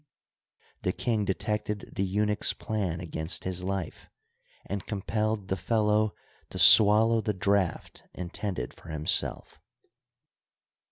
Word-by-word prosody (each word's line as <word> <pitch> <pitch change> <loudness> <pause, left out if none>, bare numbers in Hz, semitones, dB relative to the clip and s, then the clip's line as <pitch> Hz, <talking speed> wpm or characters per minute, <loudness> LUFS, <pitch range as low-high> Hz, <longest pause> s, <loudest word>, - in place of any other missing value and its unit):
The - - -1
king 110 -4 -1
detected 105 +1 -3
the 95 - 0
eunuch's 105 +2 0
plan 95 -6 -3
against 80 0 -4
his 90 -1 -2
life, 95 -3 -5 0.6
and 100 -1 -4
compelled 105 0 -2
the 95 - -1
fellow 105 +2 +1 0.3
to - - -8
swallow 110 +2 +7
the 105 -2 -2
draught 95 -1 -1
intended 90 -5 -4
for - - -15
himself. 80 -1 -2
100 Hz, 110 wpm, -28 LUFS, 90-105 Hz, 0.6 s, swallow